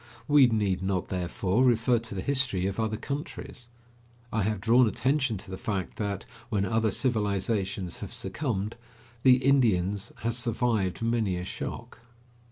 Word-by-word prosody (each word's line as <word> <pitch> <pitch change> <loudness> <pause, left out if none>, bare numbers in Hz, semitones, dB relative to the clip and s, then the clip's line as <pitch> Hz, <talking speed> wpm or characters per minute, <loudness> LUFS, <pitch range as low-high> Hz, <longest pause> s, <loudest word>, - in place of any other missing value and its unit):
We 145 -3 +7
need 105 -5 0
not, 95 -1 -1
therefore, 95 +4 0
refer 120 -1 +3
to 115 -3 -6
the 95 - -3
history 130 -10 +1
of 95 +2 -2
other 110 -1 0
countries. 140 - -6 0.6
I 110 - +1
have 105 +1 0
drawn 115 +4 +5
attention 130 +1 +1
to 95 - -11
the 95 - -6
fact 95 -5 -3
that, 100 -2 -3 0.2
when 100 -4 +1
other 110 +2 +1
civilizations 100 -5 -1
have - - -7
succumbed, 115 -7 -3 0.4
the 130 0 +7
Indians 105 -7 +2
has 115 0 0
survived 115 -5 0
many 115 -5 +1
a 90 - -4
shock. - - -6
110 Hz, 150 wpm, -28 LUFS, 95-120 Hz, 0.6 s, We